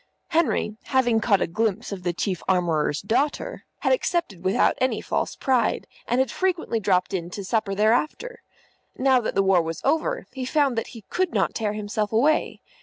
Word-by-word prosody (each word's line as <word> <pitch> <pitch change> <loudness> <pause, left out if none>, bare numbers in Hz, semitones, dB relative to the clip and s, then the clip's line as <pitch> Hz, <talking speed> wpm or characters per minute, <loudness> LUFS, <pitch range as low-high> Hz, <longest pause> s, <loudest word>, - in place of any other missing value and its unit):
Henry, 320 -10 +1
having 245 -4 +2
caught 205 -4 +2
a - - +1
glimpse 220 +5 -1
of 195 -2 -5
the 175 0 0
Chief 180 +1 -2
Armourer's 165 -5 +1
daughter, 270 +9 -1 0.2
had - - +3
accepted 340 - -1
without 190 +1 +3
any 255 - +1
false - - -2
pride, 255 -5 +1 0.2
and 245 +2 +1
had 265 - +1
frequently 360 -11 -1
dropped 190 -2 +1
in 175 -2 -2
to 195 +2 -6
supper 215 -1 0
thereafter. 245 - 0 0.6
Now 260 -1 +4
that 220 - -3
the 195 - +3
war 190 -2 +4
was 165 0 -4
over, 320 - 0
he 265 - -5
found 275 -1 +1
that 225 - -2
he 220 - -11
could 365 -1 0
not - - +1
tear 215 -2 -1
himself 210 0 -2
away. 285 +8 +2
225 Hz, 180 wpm, -24 LUFS, 195-270 Hz, 0.6 s, Now